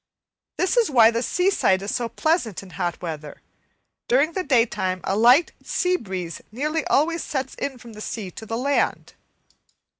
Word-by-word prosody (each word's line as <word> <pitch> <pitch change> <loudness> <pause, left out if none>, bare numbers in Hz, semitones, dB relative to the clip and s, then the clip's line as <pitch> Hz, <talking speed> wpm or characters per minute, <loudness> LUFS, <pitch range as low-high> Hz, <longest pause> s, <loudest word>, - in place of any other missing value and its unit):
This 370 +6 +1
is 470 -3 +4
why 230 -5 +6
the 230 0 -1
seaside 350 - +2
is 200 - -3
so 240 -2 -1
pleasant 250 - 0
in 190 - -13
hot 175 -2 -3
weather. 155 -3 -6 0.7
During 280 +6 +3
the 375 - -1
daytime 230 - +1
a 195 - -1
light 245 +9 +5
sea 365 -1 0
breeze 185 - -5
nearly 300 +7 -1
always 330 +4 +2
sets 265 -2 -3
in 270 -2 -4
from 235 -2 -13
the 215 - -10
sea 210 -4 -5
to 220 - -10
the 225 - -2
land. 280 +3 0
240 Hz, 170 wpm, -23 LUFS, 195-305 Hz, 0.7 s, why